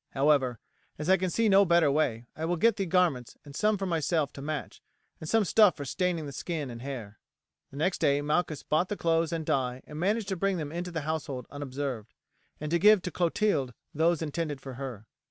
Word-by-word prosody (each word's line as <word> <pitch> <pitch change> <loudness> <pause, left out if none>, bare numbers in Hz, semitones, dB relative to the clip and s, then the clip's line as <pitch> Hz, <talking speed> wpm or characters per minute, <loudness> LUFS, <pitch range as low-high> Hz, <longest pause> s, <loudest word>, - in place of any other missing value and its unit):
However, 135 -4 +3 0.4
as 155 +5 0
I 190 - +6
can 185 0 -1
see 230 +5 +1
no 200 -1 +6
better 170 -5 +4
way, 125 -6 0
I 155 - -6
will 175 +2 0
get 225 +6 +3
the 195 -2 -1
garments 165 -9 +1
and 140 -1 -11
some 210 +4 +2
for 195 - -3
myself 160 -4 0
to 140 - -8
match, 150 0 -5 0.4
and 155 - -7
some 225 -2 +3
stuff 205 -2 +5
for 145 - -5
staining 175 +2 -1
the 140 - -6
skin 150 -2 -4
and 115 0 -8
hair." 120 -6 -7 0.5
The 135 - -11
next 175 +5 0
day 140 0 +3
Malchus 150 0 0
bought 165 +4 +1
the 205 - -3
clothes 165 -1 +1
and 165 -2 -3
dye 125 -2 -1
and 150 0 -8
managed 205 +3 0
to 190 - -1
bring 195 +1 0
them 150 -3 -4
into 175 +2 -4
the 165 -2 -3
house 155 0 -3
unobserved, 135 -3 -5 0.4
and 150 0 -4
to 170 - +3
give 210 +1 +6
to 180 - -3
Clotilde 165 - 0 0.2
those 165 +1 +2
intended 150 -2 -3
for 135 -1 -8
her. 125 -5 -7
155 Hz, 215 wpm, -29 LUFS, 140-180 Hz, 0.5 s, I